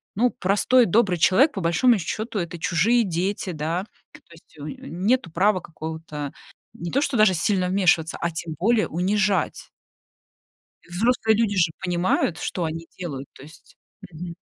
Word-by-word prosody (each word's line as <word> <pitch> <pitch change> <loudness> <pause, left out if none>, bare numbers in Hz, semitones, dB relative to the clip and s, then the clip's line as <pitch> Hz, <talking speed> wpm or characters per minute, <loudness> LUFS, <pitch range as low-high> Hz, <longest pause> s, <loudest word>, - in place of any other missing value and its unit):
ну, 245 +5 +3
простой 210 +6 +3
добрый 190 -2 +2
человек, 250 - +4
по 195 - -4
большому 180 +8 +3
счёту, 215 +4 -4
это 170 -1 -5
чужие 210 +10 +2
дети, 185 +2 -2
да, 165 +4 -3 0.3
то - - -13
есть 165 -1 -20
унё 145 - -7 0.2
унё - - -9
нету 185 +3 0
права 190 +4 +2
какого-то 160 -3 -7 0.4
не 170 - -6
то 275 - +1
что 280 -4 0
даже 215 -3 +5
сильно 185 +2 +1
вмешиваться, 175 -4 +2
а 170 - 0
тем 160 0 -5
более 225 +3 +2
унижать. 190 +1 0 1.2
Взрослые 220 +4 +1
люди 215 -2 +1
же 170 -3 +3
понимают, 175 -2 0
что 175 - -3
они 165 +1 -4
делают, 140 -7 -6
то - - -15
есть. 155 +4 -16 0.3
Мгм. 170 +1 -8
180 Hz, 160 wpm, -23 LUFS, 165-210 Hz, 1.2 s, даже